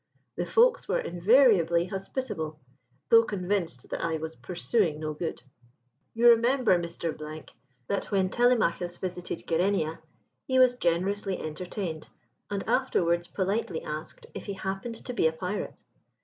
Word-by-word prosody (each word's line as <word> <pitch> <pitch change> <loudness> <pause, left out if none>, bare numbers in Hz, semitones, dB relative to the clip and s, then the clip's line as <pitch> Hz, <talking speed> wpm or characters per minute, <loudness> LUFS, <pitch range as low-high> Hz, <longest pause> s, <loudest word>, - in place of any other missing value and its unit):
The - - -2
folks - - +4
were - - +1
invariably 185 - +4
hospitable, 185 - -4 0.5
though 230 - +8
convinced 185 - -2
that - - -3
I 165 -1 0
was 160 +1 -6
pursuing 175 -3 0
no 155 -1 -3
good. 160 -4 -5 0.7
You 240 +1 +6
remember, 235 -1 +4
Mr., 170 -1 -4 0.7
that 200 +9 -1
when 190 -2 0
Telemachus 220 -8 +2
visited 180 -2 -5
Gerenia 165 -2 0 0.5
he 260 - +1
was 255 -1 +6
generously 190 -1 0
entertained, 160 +1 -5 0.4
and 200 -1 -3
afterwards 170 0 +1
politely 190 -3 -2
asked 155 +1 -6
if - - -7
he 200 - -4
happened 195 +4 -5
to 250 - -4
be 200 - +3
a 160 - -1
pirate. 180 +5 -5
185 Hz, 135 wpm, -28 LUFS, 170-225 Hz, 0.7 s, though